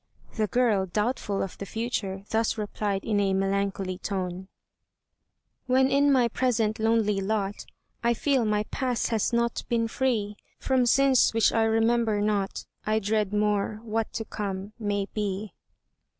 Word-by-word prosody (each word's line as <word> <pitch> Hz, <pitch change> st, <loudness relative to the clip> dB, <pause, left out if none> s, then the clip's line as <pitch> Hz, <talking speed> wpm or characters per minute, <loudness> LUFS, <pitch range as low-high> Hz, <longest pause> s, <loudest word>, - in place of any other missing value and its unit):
The 215 Hz, -2 st, +1 dB
girl, 215 Hz, -5 st, +2 dB
doubtful 210 Hz, +1 st, -1 dB
of 195 Hz, -, -7 dB
the 200 Hz, -, -4 dB
future, 205 Hz, -4 st, -3 dB
thus 225 Hz, +1 st, +1 dB
replied 205 Hz, -2 st, -2 dB
in 210 Hz, -2 st, +1 dB
a 195 Hz, -1 st, +2 dB
melancholy 195 Hz, -1 st, -1 dB
tone: 185 Hz, -2 st, -4 dB, 1.2 s
"When 260 Hz, +1 st, +3 dB
in 285 Hz, +1 st, +4 dB
my 255 Hz, -3 st, +4 dB
present 230 Hz, -3 st, 0 dB
lonely 220 Hz, -3 st, +2 dB
lot, 200 Hz, 0 st, -2 dB, 0.4 s
I 235 Hz, 0 st, +3 dB
feel 270 Hz, 0 st, +1 dB
my 210 Hz, -1 st, +1 dB
past 255 Hz, -3 st, -1 dB
has 225 Hz, 0 st, 0 dB
not 235 Hz, 0 st, 0 dB
been 230 Hz, -1 st, +1 dB
free 225 Hz, -4 st, -1 dB, 0.2 s
From 260 Hz, -2 st, +2 dB
sins 265 Hz, -2 st, +4 dB
which 225 Hz, -3 st, +4 dB
I 225 Hz, -1 st, +3 dB
remember 225 Hz, -1 st, +2 dB
not, 205 Hz, -2 st, -1 dB, 0.2 s
I 215 Hz, +1 st, +1 dB
dread 210 Hz, -1 st, 0 dB
more, 210 Hz, 0 st, 0 dB
what 225 Hz, 0 st, -2 dB
to 225 Hz, -, -3 dB
come, 200 Hz, -1 st, -5 dB
may 205 Hz, -2 st, -1 dB
be." 205 Hz, -1 st, -3 dB
215 Hz, 150 wpm, -27 LUFS, 200-235 Hz, 1.2 s, in